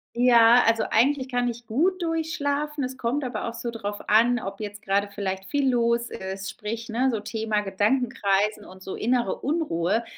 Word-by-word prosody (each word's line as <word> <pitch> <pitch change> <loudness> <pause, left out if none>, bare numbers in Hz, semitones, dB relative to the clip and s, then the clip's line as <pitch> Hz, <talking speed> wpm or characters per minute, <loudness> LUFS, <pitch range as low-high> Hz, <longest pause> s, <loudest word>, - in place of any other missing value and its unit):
Ja, 240 -1 +6
also, 225 -1 +3
eigentlich 260 +2 +2
kann 245 -1 0
ich 235 0 -5
gut 355 +11 +1
durch 325 -1 -1
schlafen. 285 0 -2
Es 260 +1 -4
kommt 260 +5 -1
aber 245 -4 -3
auch 230 - -4
so 235 0 -5
darauf 205 -2 -5
an, 235 +3 +4
ob 195 0 -7
jetzt 205 0 -6
gerade 200 0 0
vielleicht 190 -1 -3
viel 275 +5 +1
los 235 0 +1
ist, 190 0 -6
sprich, 225 +2 -6
ne, 250 +4 +1
so 220 - -2
Thema 215 0 -2
Gedankenkreisen 210 -1 0
und 185 0 -14
so 190 - -6
innere 240 -3 0
Unruhe. 235 - 0
230 Hz, 185 wpm, -25 LUFS, 205-255 Hz, -, Ja